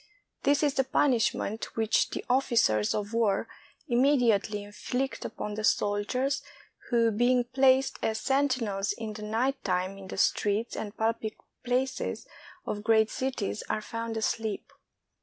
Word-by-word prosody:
This 285 +2 +2
is 290 -2 +2
the 270 - +2
punishment 240 -5 0
which 225 -1 +2
the - - -5
ofiQcers 235 - +2
of 205 +2 -7
war 220 -4 +1 0.4
imme 265 +4 +4
diately 210 -3 +1
inflict 250 +6 -3
upon 210 - -5
the 215 +1 -4
soldiers 220 +8 +1 0.5
who, 230 -2 +3
being 245 +3 +3
placed 260 +2 +3
as 220 0 0
sentinels 235 -7 0
in 220 0 -6
the 210 - -8
night 240 +6 -1
time 185 +1 -1
in 190 - -10
the - - -7
streets 210 +3 +1
and 210 0 -6
public 220 -1 -1 0.3
places 260 - -1 0.4
of 205 0 -4
great 220 0 +4
cities, 255 -6 -2
are - - 0
found 230 0 -4
asleep. 220 -1 -2
225 Hz, 140 wpm, -28 LUFS, 210-255 Hz, 0.5 s, imme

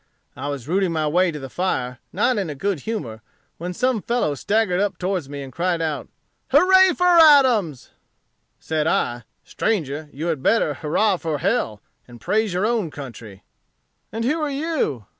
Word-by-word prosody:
I 135 +2 -5
was 140 -3 -5
rooting 185 +1 +1
my 160 -2 -1
way 180 +4 +2
to 155 - -5
the 135 -2 -7
fire, 130 -7 -2
not 235 +3 +1
in 190 -5 -3
a 150 - -5
good 195 +4 -2
humor, 135 - -5 0.4
when 175 +2 -4
some 245 +4 0
fellow 235 -10 0
staggered 200 +4 0
up 205 -1 -1
towards 180 -6 -2
me, 140 -1 -6
and 135 -2 -10
cried 175 +3 0
out, 155 -3 -3 0.4
'Hurrah 375 -1 +5
for 360 -1 +4
Adams.' 255 - +5 0.7
"Said 155 -1 -1
I, 120 -6 -1 0.2
'Stranger, 155 -8 -2
you 150 +4 -6
had 160 -5 -1
better 155 -3 +2
hurrah 180 +8 +1
for 160 -3 -3
hell, 170 - -1 0.2
and 120 -1 -13
praise 215 - 0
your 180 +3 0
own 220 -6 0
country.' 115 -8 -10 0.7
"'And 225 +3 -3
who 310 +6 0
are 300 - -1
you? 280 - -2
175 Hz, 175 wpm, -22 LUFS, 145-225 Hz, 0.7 s, Hurrah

